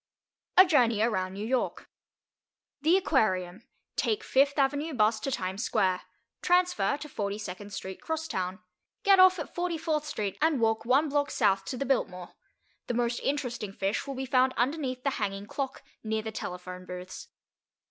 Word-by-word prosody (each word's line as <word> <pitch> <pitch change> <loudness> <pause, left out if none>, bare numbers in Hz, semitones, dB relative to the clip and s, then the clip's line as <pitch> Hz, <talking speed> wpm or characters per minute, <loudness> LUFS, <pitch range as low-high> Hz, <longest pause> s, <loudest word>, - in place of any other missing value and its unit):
A 370 - +10
JOURNEY 235 - +3
AROUND 190 -5 0
NEW 205 +2 -4
YORK 250 +2 -1 0.9
The 325 +5 +5
Aquarium. 210 - 0 0.3
Take 435 0 0
Fifth 280 -2 +3
Avenue 285 +2 +1
Bus 220 -1 +3
to 275 - -3
Times 190 -1 -2
Square. 185 -4 +1 0.4
Transfer 360 -4 +2
to 300 - -8
42nd 205 -4 -5
Street 190 -1 -6
Crosstown. 190 - -3 0.4
Get 395 -1 +6
off 370 0 +7
at 315 - -6
44th 330 -3 -1
Street, 205 -9 -3
and 310 -3 +3
walk 225 -1 +1
one 270 +6 +3
block 285 0 +1
south 195 -4 +2
to 250 - -4
the 275 - -2
Biltmore. 180 -10 -1 0.5
The 240 - -1
most 240 0 0
interesting 245 -8 -2
fish 195 +7 -2
will 275 - -4
be 265 +1 -3
found 255 0 +3
underneath 255 0 -1
the 275 - +1
hanging 200 -1 -2
clock, 265 +4 -4 0.2
near 220 0 -1
the 220 - -4
telephone 180 -2 -6
booths. 180 0 -8
245 Hz, 155 wpm, -29 LUFS, 200-290 Hz, 0.9 s, A